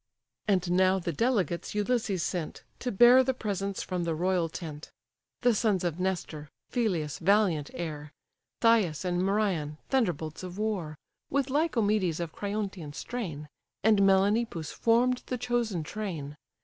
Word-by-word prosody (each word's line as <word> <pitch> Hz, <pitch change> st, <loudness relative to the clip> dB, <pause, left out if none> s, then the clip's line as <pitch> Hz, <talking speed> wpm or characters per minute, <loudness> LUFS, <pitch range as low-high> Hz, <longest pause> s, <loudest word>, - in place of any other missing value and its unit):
And 185 Hz, -3 st, +2 dB
now 185 Hz, +1 st, +4 dB
the 170 Hz, -2 st, -3 dB
delegates 200 Hz, -, 0 dB
Ulysses 210 Hz, -4 st, 0 dB
sent, 175 Hz, -4 st, -3 dB, 0.2 s
To 250 Hz, -, -2 dB
bear 240 Hz, +5 st, +7 dB
the 260 Hz, 0 st, 0 dB
presents 200 Hz, -3 st, -3 dB
from 180 Hz, -2 st, -2 dB
the 165 Hz, -1 st, -1 dB
royal 175 Hz, 0 st, +1 dB
tent: 155 Hz, -2 st, -7 dB, 0.5 s
The 245 Hz, -1 st, +4 dB
sons 210 Hz, -4 st, +1 dB
of 175 Hz, -1 st, -2 dB
Nestor, 170 Hz, -5 st, -3 dB, 0.2 s
Phyleus' 180 Hz, -, -1 dB
valiant 180 Hz, -5 st, +2 dB
heir, 150 Hz, -3 st, -5 dB, 0.5 s
Thias 205 Hz, -9 st, +3 dB
and 180 Hz, 0 st, 0 dB
Merion, 190 Hz, -7 st, 0 dB
thunderbolts 170 Hz, -, 0 dB
of 180 Hz, 0 st, -7 dB
war, 195 Hz, -8 st, -2 dB, 0.3 s
With 275 Hz, -1 st, 0 dB
Lycomedes 215 Hz, -, +1 dB
of 170 Hz, -2 st, -3 dB
Creiontian 200 Hz, -7 st, -4 dB
strain, 165 Hz, -13 st, -5 dB, 0.4 s
And 215 Hz, -1 st, +5 dB
Melanippus, 195 Hz, -3 st, +2 dB
form'd 245 Hz, +2 st, +2 dB
the 250 Hz, -, -2 dB
chosen 240 Hz, -8 st, -1 dB
train. 155 Hz, -6 st, -5 dB
190 Hz, 135 wpm, -29 LUFS, 165-220 Hz, 0.5 s, bear